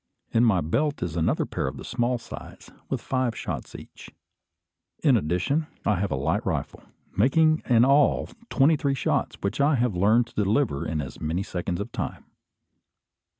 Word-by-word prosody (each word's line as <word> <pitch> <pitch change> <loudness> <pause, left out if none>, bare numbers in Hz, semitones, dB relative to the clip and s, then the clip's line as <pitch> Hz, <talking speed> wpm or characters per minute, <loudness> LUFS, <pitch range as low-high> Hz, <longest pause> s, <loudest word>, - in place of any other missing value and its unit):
In 115 - +3
my 105 -7 +4
belt 140 - 0
is 85 -3 -4
another 80 -1 +1
pair - - -3
of 70 +1 -5
the 65 - -8
small 120 0 0
size, 115 - -11 0.2
with - - -1
five 130 -3 -1
shots - - -5
each. - - -11 0.9
In 140 -5 +5
addition, 105 - 0 0.2
I 100 -3 +2
have 100 +1 -1
a - - +1
light 65 - 0
rifle, - - -3 0.3
making 155 - +3
in 120 0 +6
all 140 +1 +3 0.2
twenty 150 +3 +4
three 140 -1 0
shots, - - 0
which 100 +7 -1
I 145 +1 +4
have 125 -3 +1
learned 110 +6 +4
to 110 -2 -2
deliver 105 - 0
in 80 -1 -1
as 70 - -8
many 80 +5 -1
seconds 90 -2 -3
of 105 +4 -5
time. - - -5
115 Hz, 175 wpm, -26 LUFS, 90-135 Hz, 0.9 s, in